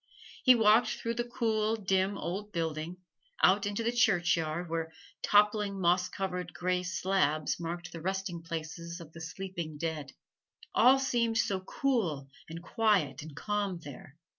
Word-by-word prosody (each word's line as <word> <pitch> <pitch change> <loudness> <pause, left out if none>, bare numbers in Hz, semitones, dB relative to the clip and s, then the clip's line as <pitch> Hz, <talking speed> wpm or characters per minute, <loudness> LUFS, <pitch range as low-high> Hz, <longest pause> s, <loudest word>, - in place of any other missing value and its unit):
He 255 -2 +7
walked 225 +1 +5
through 230 - -2
the 240 +1 -1
cool, 220 -3 +1
dim, 195 -1 0
old 200 +4 -4
building, 165 0 -3 0.5
out 200 +2 +5
into 205 +3 -2
the 235 - +1
churchyard, 175 -7 +2
where 165 0 -3 0.3
toppling 205 -1 +3
moss 180 0 +2
covered 180 -2 -4
gray 180 0 0
slabs 180 -5 0
marked 170 0 -5
the 165 - -8
resting 190 -1 -3
places 165 +1 -6
of 160 -2 -12
the 165 - -10
sleeping 170 -2 -6
dead. 155 -3 -4 0.6
All 260 +2 +6
seemed 235 -4 +1
so 195 -3 +1
cool 185 - -1 0.2
and 165 +1 -7
quiet 195 - +1
and 150 -1 -10
calm 200 0 -2
there! 140 0 -11
180 Hz, 145 wpm, -31 LUFS, 165-210 Hz, 0.6 s, He